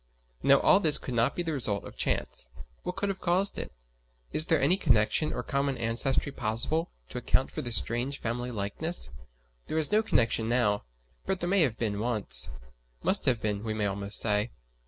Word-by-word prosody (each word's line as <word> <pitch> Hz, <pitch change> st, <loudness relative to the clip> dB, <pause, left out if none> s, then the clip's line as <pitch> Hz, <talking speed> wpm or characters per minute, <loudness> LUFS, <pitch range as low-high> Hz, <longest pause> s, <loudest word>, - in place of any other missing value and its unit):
Now 140 Hz, 0 st, +5 dB
all 195 Hz, -, +5 dB
this 155 Hz, -6 st, +3 dB
could 130 Hz, -, -6 dB
not 120 Hz, +3 st, +1 dB
be 175 Hz, -, -1 dB
the 165 Hz, -2 st, -2 dB
result 105 Hz, -8 st, 0 dB
of -, -, -11 dB
chance. -, -, -2 dB, 0.3 s
What 180 Hz, 0 st, -5 dB
could 200 Hz, -, -2 dB
have 195 Hz, -, -4 dB
caused 185 Hz, +3 st, +3 dB
it? -, -, -6 dB, 0.6 s
Is 155 Hz, -, 0 dB
there 160 Hz, -, +3 dB
any 145 Hz, +7 st, +4 dB
connection 120 Hz, -, +2 dB
or -, -, -4 dB
common 140 Hz, -1 st, -1 dB
ancestry 120 Hz, +5 st, 0 dB
possible, 135 Hz, +8 st, -1 dB, 0.2 s
to -, -, -5 dB
account -, -, 0 dB
for -, -, -4 dB
this 120 Hz, -2 st, 0 dB
strange 125 Hz, +4 st, 0 dB
family 120 Hz, +2 st, -3 dB
likeness? 120 Hz, -, -1 dB, 0.6 s
There 155 Hz, -, -2 dB
is 155 Hz, +2 st, +2 dB
no 215 Hz, +1 st, +4 dB
connection 115 Hz, -, +1 dB
now, 105 Hz, -, +1 dB, 0.4 s
but 190 Hz, -1 st, 0 dB
there 175 Hz, -, -2 dB
may 195 Hz, 0 st, +4 dB
have 125 Hz, -8 st, +2 dB
been 105 Hz, -3 st, -2 dB
once. 105 Hz, -, 0 dB, 0.5 s
Must -, -, +4 dB
have 120 Hz, -4 st, +1 dB
been, 105 Hz, -1 st, -1 dB
we 110 Hz, -1 st, -3 dB
may 105 Hz, -1 st, -1 dB
almost 100 Hz, +1 st, 0 dB
say. 105 Hz, +1 st, +1 dB
120 Hz, 195 wpm, -28 LUFS, 110-160 Hz, 0.6 s, Now